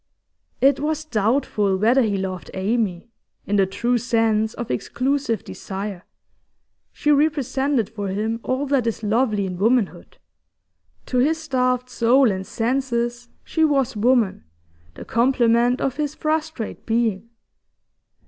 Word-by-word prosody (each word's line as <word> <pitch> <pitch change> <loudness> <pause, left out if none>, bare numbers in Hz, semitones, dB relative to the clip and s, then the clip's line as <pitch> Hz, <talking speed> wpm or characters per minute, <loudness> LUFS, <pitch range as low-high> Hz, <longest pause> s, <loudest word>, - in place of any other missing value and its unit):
It 275 0 +4
was 310 +1 -2
doubtful 215 -5 +1
whether 235 +7 +4
he 210 -4 0
loved 185 -2 -5
Amy, 205 0 -1 0.3
in 205 - 0
the 195 -1 +3
true 235 +5 0
sense 225 -2 +1
of 240 - -5
exclusive 255 - -1
desire. 195 -1 -6 0.9
She 295 - 0
represented 280 -4 +1
for 205 -2 -5
him 215 +4 -2
all 260 +4 -1
that 270 -4 +1
is 225 -1 -3
lovely 215 -1 +1
in 180 -1 -5
womanhood; 225 0 0 0.9
to 250 - 0
his 305 +6 +2
starved 255 -5 0
soul 245 0 +3
and 190 0 -4
senses 240 0 -1
she 320 - 0
was 275 -6 +2
woman, 220 - +2 0.5
the - - -9
complement 240 0 +2
of 270 0 -2
his 300 -1 -2
frustrate 310 -5 -3
being. 225 -2 0
235 Hz, 130 wpm, -22 LUFS, 210-270 Hz, 0.9 s, It